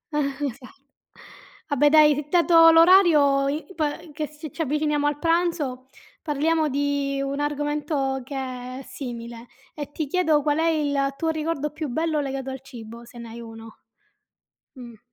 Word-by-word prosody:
Eh, 280 -1 -1
esa 250 +1 -9 1.0
vabbè 290 0 +3
dai, 300 -1 +4
dato 330 -1 +6
l'orario, 325 -5 +5
i 300 +3 -3
po 310 - 0 0.3
che 305 0 -3
si 300 -1 -10
ci - - -6
avviciniamo 300 0 0
al 290 0 -1
pranzo, 330 -6 0 0.3
parliamo 310 +1 0
di 280 0 -1
un 275 +1 -3
argomento 290 -2 -2
che 275 +2 -8 0.4
è - - -7
simile, 240 -2 -8 0.3
e 290 -1 -7
ti 305 0 -4
chiedo 315 -1 +2
qual 295 +1 +1
è 330 - +2
il 285 -3 0
tuo 325 - -1
ricordo 310 -2 -2
più 305 -1 -5
bello 315 +3 -1
legato 270 -1 -4
al 265 - -7
cibo 235 -3 -11
se 240 0 -15
ne 235 -1 -9
hai 235 +1 -9
uno. 225 -1 -11 1.0
Mh. 240 -3 -11
290 Hz, 155 wpm, -24 LUFS, 270-310 Hz, 1.0 s, dato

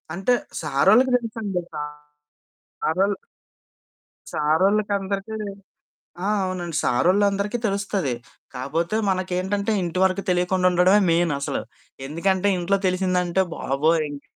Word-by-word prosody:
అంటే 195 +7 +2 0.3
సారోళ్ళకి 190 - +4
తెలుసండి. 220 -6 -3 1.2
సారొల్ 195 +5 +2 1.2
సారోళ్ళకందరికీ 195 +5 +1 0.9
ఆ! - - +1 0.2
అవునండి. 175 -3 -3
సారోళ్లందరికి 200 - +2
తెలుస్తది. 195 - -1 0.4
కాపోతే 160 +10 -2
మనకేంటంటే 190 +3 -1
ఇంటి 175 0 -3
వరకు 190 +1 +1
తెలియకుండా 180 +1 +2
ఉండడమే 185 +4 +5
మెయిన్ 165 -1 +2
అసలు. 140 - -2 0.4
ఎందుకంటే 190 +6 +1
ఇంట్లో 190 +3 +1
తెలిసిందంటే 185 0 +1
బాబోయ్! 155 +4 +1
ఇంక్ 145 -1 -9
185 Hz, 90 wpm, -23 LUFS, 170-200 Hz, 1.2 s, ఉండడమే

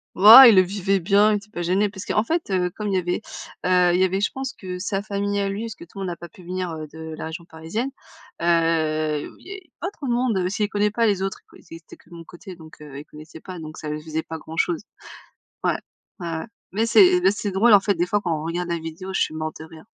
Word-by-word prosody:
Oh, 215 +7 +11
il 230 -5 +8
le 185 - +8
vivait 195 +1 0
bien, 205 +4 +4
il - - +2
était 205 +1 -12
pas 175 - -6
gêné. 190 +4 +1
Parce 195 -1 -9
qu'en 210 - +1
fait, 330 -2 -2
heu, 180 -1 +1
comme 210 +1 -5
il 195 - 0
y - - +3
avait, 175 -1 -1 0.4
heu, 180 -1 +4
il 180 - +1
y - - +4
avait 190 +1 +1
je 205 - +1
pense 265 -1 -4
que 185 -2 -7
sa 195 +1 -2
famille 200 0 -2
à 200 - 0
lui, 195 +2 -4
parce 225 -2 -6
que - - -12
tout 190 +3 -13
le - - -5
monde 190 - -3
n'a 170 - -5
pas 170 - -9
pu 180 +2 -17
venir, 185 0 -4
heu, 155 -1 -6
de 160 +1 -9
la - - -5
région 170 +1 -8
parisienne, 165 +10 -4 0.5
heu, 160 -3 +1
il - - -17
y - - -9
avait 380 -4 -10
pas 360 - -3
trop 300 -9 -8
de 240 - 0
monde, 240 -4 +1
heu, 180 0 0
c'est 210 +2 -2
il - - -3
connaît 210 0 +1
pas 230 +2 +1
les 200 -3 +1
autres, 195 0 -3
quoi - - -17
ils - - -13
étaient 165 - -15
que - - -25
de 170 - -12
mon 165 - -11
côté, 180 +2 -11
donc, 160 -2 -15
heu, 140 -2 -9
il 150 - -10
connaissait 155 +2 -13
pas, 185 +2 -9
donc 155 0 -9
ça 155 - -7
lui 150 0 -4
faisait 160 0 -3
pas 160 - -7
grand-chose. 165 +2 -2 0.8
Ouais. - - +1 0.4
Ouais, 175 - -5
ouais. - - -6 0.3
Mais 220 +4 0
c'est 360 - +6
mais 195 - +5
c'est 205 0 -3
drôle 215 +4 +4
en 205 - +9
fait 200 +1 0
des 175 +1 0
fois 205 +3 0
quand 170 -4 -1
on - - -6
regarde 175 +2 -3
la 170 - -1
vidéo, 165 +4 -7
je - - 0
suis - - 0
morte 155 0 -4
de 160 - -8
rire. 160 -1 -14
185 Hz, 290 wpm, -23 LUFS, 165-205 Hz, 0.8 s, Oh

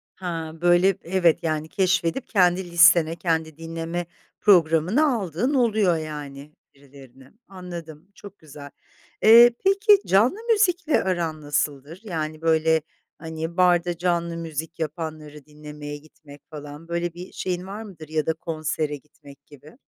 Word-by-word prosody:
Ha! 165 -3 -5
Böyle, 175 +2 +3
evet, 175 -2 +1
yani, 155 -1 -2
keşfedip 185 +6 0
kendi 180 -3 +1
listene, 170 -1 +5
kendi 160 -3 -2
dinleme 165 +1 -5 0.4
programına 185 - +3
aldığın 205 - -2
oluyor, 215 - +2
yani, 150 -2 -8 0.2
birilerini. 135 -1 -17 0.2
Anladım, 170 -4 -10
çok 205 0 -13
güzel. 145 -2 -12 0.5
Eee, 235 +2 +8 0.2
peki 400 +2 +5
canlı 220 - +3
müzikle 365 -7 +2
aran 170 -4 -2
nasıldır? 145 +2 -3
Yani, 155 -6 -5
böyle, 160 0 +2 0.4
hani, 160 +1 -6
barda 175 -1 +2
canlı 170 -1 -1
müzik 165 0 -6
yapanları 155 -2 -6
dinlemeye 150 -1 -9
gitmek 145 -1 -17
falan, 150 +1 -10
böyle 170 0 -3
bir 180 +2 -10
şeyin 180 0 -4
var 205 +3 -7
mıdır 170 -7 -12
ya 155 -1 -1
da 160 - 0
konsere 155 -2 -3
gitmek 145 0 -17
gibi? 150 - -17
165 Hz, 130 wpm, -23 LUFS, 155-180 Hz, 0.5 s, Eee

